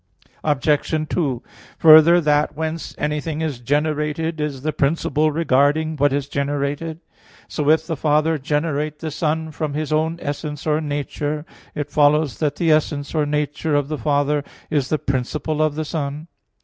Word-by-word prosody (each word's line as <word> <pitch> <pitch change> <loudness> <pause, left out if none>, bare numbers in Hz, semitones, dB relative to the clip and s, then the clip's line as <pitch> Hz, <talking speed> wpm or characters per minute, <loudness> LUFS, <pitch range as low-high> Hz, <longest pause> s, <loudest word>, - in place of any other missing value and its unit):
Obj. 150 +1 +1
2: 135 -8 -1 0.3
Further, 160 +2 +8
that 150 -2 +1
whence 160 +1 -4
anything 150 +1 -2
is 150 -6 -2
generated 150 +4 -1
is 140 -3 -3
the 155 0 -1
principle 150 +1 +1
regarding 155 +1 +2
what 145 -1 +2
is 140 0 -1
generated. 145 +3 -2 0.5
So 150 -2 -1
if 160 0 +4
the 165 - -2
Father 155 +2 +1
generate 150 +1 -1
the 160 0 -5
Son 160 +1 -1
from 150 -1 -3
His 155 0 -2
own 160 +2 +1
essence 150 0 -5
or 155 0 +1
nature, 145 0 -3 0.3
it 145 - -4
follows 150 -1 +3
that 150 -2 0
the 165 -2 +2
essence 145 -2 0
or 150 -2 +1
nature 150 +1 -1
of 145 -1 0
the 155 - -2
Father 145 +3 +1 0.3
is 140 -3 0
the 155 - +1
principle 140 +3 -2
of 155 -1 +1
the 155 0 -2
Son. 150 0 -4
150 Hz, 160 wpm, -21 LUFS, 145-155 Hz, 0.5 s, Further